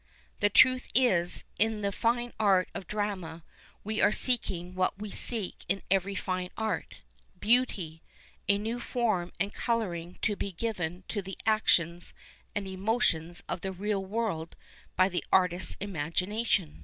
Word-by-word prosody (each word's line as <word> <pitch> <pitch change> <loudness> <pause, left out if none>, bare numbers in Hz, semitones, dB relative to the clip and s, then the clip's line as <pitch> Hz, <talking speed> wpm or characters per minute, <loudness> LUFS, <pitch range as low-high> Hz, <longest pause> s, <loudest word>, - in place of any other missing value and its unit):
The 205 - +4
truth 255 +4 +6
is, 185 -9 +4 0.2
in 220 0 +2
the 200 -1 0
fine 240 +3 0
art 195 -4 +4
of 185 - -6
drama 190 -6 -3 0.4
we 215 +1 -1
are 205 - +5
seeking 185 -8 0
what 185 +1 0
we 210 0 -6
seek 220 -4 -3
in 195 +1 0
every 195 +1 +2
fine 185 -1 -2
art 220 -1 -2 0.2
— - - -34
beauty, 190 -10 +2 0.5
a 200 - +5
new 225 +4 -3
form 215 -8 0
and 200 +1 -1
colouring 180 -8 -2
to 210 - +2
be 200 -1 -4
given 180 -3 -3
to 205 - -1
the 195 0 -7
actions 175 -6 +2 0.4
and 200 -1 -2
emotions 185 -4 0
of - - -3
the 190 - -3
real 195 +1 -1
world 190 -5 -2 0.4
by 185 0 +5
the 180 -2 -2
artist's 180 -1 +3
imagi 180 -2 -2
nation. 205 -7 0
195 Hz, 155 wpm, -30 LUFS, 180-220 Hz, 0.5 s, truth